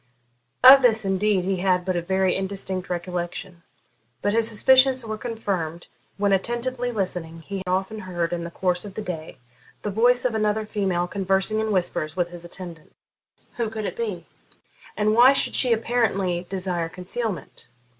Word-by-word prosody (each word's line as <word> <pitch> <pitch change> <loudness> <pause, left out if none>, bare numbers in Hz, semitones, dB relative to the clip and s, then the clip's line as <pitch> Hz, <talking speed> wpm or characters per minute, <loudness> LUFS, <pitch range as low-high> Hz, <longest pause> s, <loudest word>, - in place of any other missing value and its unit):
Of 270 +2 +11
this, 225 -4 +3
indeed, 195 -1 +1
he 190 0 0
had 180 -1 +1
but 185 -1 -1
a 175 - 0
very 190 +1 +1
indistinct 190 -1 -4
recollection, 180 0 -4 0.6
but 205 - +1
his 225 0 +2
suspicions 260 +3 +4
were 220 -1 -3
confirmed 195 -8 -4 0.3
when, 200 0 +2
attentively 240 +5 -1
listening, 180 -6 -4
he 195 +4 -6
often 190 +4 -1
heard, 175 -3 -3
in 170 -1 -3
the 170 - -5
course 180 0 -1
of 200 -2 -9
the 215 - -4
day, 165 -7 -6 0.5
the 210 - -2
voice 245 +5 +3
of 250 - +1
another 215 0 0
female 190 -5 -1
conversing 195 +3 0
in 220 0 -1
whispers 175 -5 -1
with 175 -1 0
his 175 -1 -9
attendant. 175 -2 -10 0.6
Who 235 -2 -1
could 215 -1 -5
it - - -4
be? 200 -8 -4 0.7
And 215 0 +2
why 245 +4 +7
should 275 - +1
she 250 - +4
apparently 200 -6 0
desire 180 -3 -2
concealment? 185 +4 -5
195 Hz, 165 wpm, -24 LUFS, 180-220 Hz, 0.7 s, Of